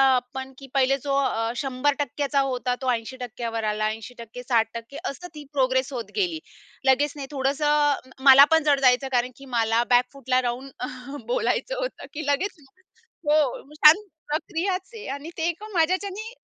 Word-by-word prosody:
आपण, 265 +2 -4
की 270 0 -11
पहिले 270 0 +3
जो 280 -1 0
अ, 225 -5 0
100% 285 +2 -1
चा 280 - +4
होता, 250 -2 -1
तो 255 -1 +1
80% 240 0 -4
वर 225 0 -3
आला. 215 0 0
80% 235 +2 -9
60% 230 +1 -1
अशी 315 +6 -5
ती 300 - -8
प्रोग्रेस 260 0 +1
होत 240 -2 -5
गेली. 355 -6 0 0.5
लगेच 275 +2 +3
नाही, 280 -2 -6
थोडंसं 275 +2 -1
अ, 290 -3 +2
मला 275 0 +10
पण 320 -1 +5
जड 285 -2 +3
जायचं. 255 0 +4
कारण 250 0 +1
की 275 - -12
मला 225 +1 +2
बॅकफूटला 255 +1 +2
राहून 250 +2 -3 0.6
बोलायचं - - 0
होतं, - - -4
की 310 0 -5
लगेच 320 +6 -1 0.7
हो. 295 -3 +2
छान 305 +6 +7 0.3
प्रक्रियाच 345 +5 -2
आहे 440 - -9
आणि 285 +4 -7
ते 325 +1 0
एका 415 +6 -6
माझ्याच्याने 385 +6 0
275 Hz, 160 wpm, -25 LUFS, 250-300 Hz, 0.7 s, मला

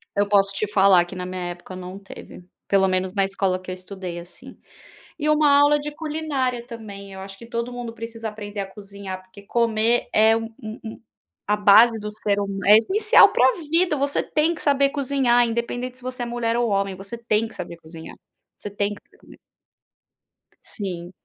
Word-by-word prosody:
Eu 205 0 +2
posso 200 -1 +3
te 215 - -1
falar 195 -3 +5
que 175 - -11
na 180 0 -5
minha 185 0 -5
época 175 +1 -9
não 185 +1 -8
teve, 190 -2 -12 0.3
pelo 195 -1 +4
menos 185 0 -1
na 195 -2 +2
escola 195 -1 -1
que 185 - -11
eu 185 - -3
estudei, 185 -1 -8
assim. 175 +1 -12 0.6
E 300 - -1
uma 305 -1 +4
aula 290 +1 +5
de 295 0 -5
culinária 295 -6 -2
também, 205 -4 -9
eu 190 - -9
acho 195 +1 -9
que 230 - -12
todo 235 +1 -4
mundo 240 -2 -6
precisa 225 0 -6
aprender 205 -1 -6
a - - -3
cozinhar, 200 -1 -9
porque 185 +2 -16
comer 230 +1 +1
é 220 +1 +5
um 225 0 -5
um 220 +1 -8 0.5
a 210 +1 +2
base 220 +3 +6
do 210 0 -5
ser 205 -1 +1
hum 200 -1 -3
é 210 +2 +8
essencial 405 - +5
para 475 - +4 0.3
vida, 335 -2 +3
você 280 +1 0
tem 315 +3 0
que - - -8
saber 280 -1 +3
cozinhar, 265 -4 +2
independente 245 +2 -3
se 255 - -14
você 255 -1 -4
é - - -3
mulher 235 -1 -1
ou 240 -1 +1
homem, 195 -1 0
você 195 +5 -8
tem 225 -1 0
que 220 - -14
saber 170 -1 -7
cozinhar, 160 0 -11 0.4
você - - -7
tem 205 0 -2
precisa 205 - -17
comer. - - -17 1.3
Sim, 180 -4 -5
215 Hz, 195 wpm, -23 LUFS, 195-245 Hz, 1.3 s, é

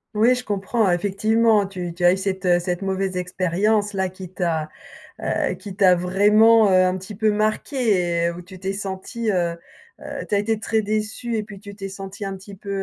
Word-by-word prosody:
Oui, 230 +4 +5
je 250 0 -3
comprends, 205 0 0
effectivement, 205 +3 +2
tu 180 -3 -5
tu 175 +1 -6
as 175 - +6
eu 190 - -1
cette, 190 0 -3
heu, 175 0 +4
cette 175 +1 -3
mauvaise 190 -1 -2
expérience 190 +4 0
là 190 -1 0
qui 185 0 -9
t'a, 165 -4 -1 0.5
heu, - - -1
qui 200 -3 -9
t'a 185 -3 +5
vraiment, 210 +5 +5
heu, 185 0 +5
un 185 0 +1
petit 190 +2 -8
peu 215 +1 +2
marquée 210 - 0
et 170 - +2
où 175 +1 -7
tu 185 0 -13
t'es 195 0 -2
sentie, 200 +3 -3
heu, 170 -2 0 0.4
heu - - -6
tu - - +1
as - - +3
été 215 +1 0
très 220 -1 0
déçue 215 +2 -2
et - - 0
puis 205 -2 -11
tu 200 0 -10
t'es 195 -1 -7
sentie 195 +1 -8
un 195 0 -4
petit 195 +2 -12
peu, 200 +1 -11
195 Hz, 210 wpm, -22 LUFS, 185-215 Hz, 0.5 s, as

